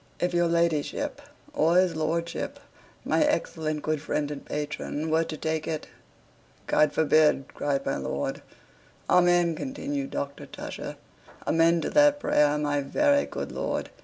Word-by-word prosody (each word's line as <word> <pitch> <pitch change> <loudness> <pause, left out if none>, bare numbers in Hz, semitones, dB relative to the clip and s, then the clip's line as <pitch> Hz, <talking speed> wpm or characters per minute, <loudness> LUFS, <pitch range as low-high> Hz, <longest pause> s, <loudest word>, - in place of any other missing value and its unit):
If 180 0 0
your 175 0 +3
ladyship 170 - 0 0.3
or 170 - +3
his 185 -2 +3
lordship, 165 +2 -2 0.5
my 310 - +3
excellent 160 - -1
good 155 -1 -1
friend 150 -1 -2
and 145 - -6
patron, 150 +1 -4
were 160 +1 +3
to 155 - -6
take 160 0 -2
it.. 155 -2 -3 0.4
." - - -32
"God 150 -1 +3
forbid!" 155 -3 +3
cried 140 -1 -1
my - - 0
lord. 70 +1 -3 0.7
"Amen," 175 -1 +4
continued 275 - -4
Dr. 140 - -5
Tusher. - - -7 0.5
"Amen 165 +1 +3
to - - -3
that 290 -1 +5
prayer, 150 - +3
my 145 -1 0
very 285 - +2
good - - -5
lord! - - -3
160 Hz, 145 wpm, -27 LUFS, 150-175 Hz, 0.7 s, that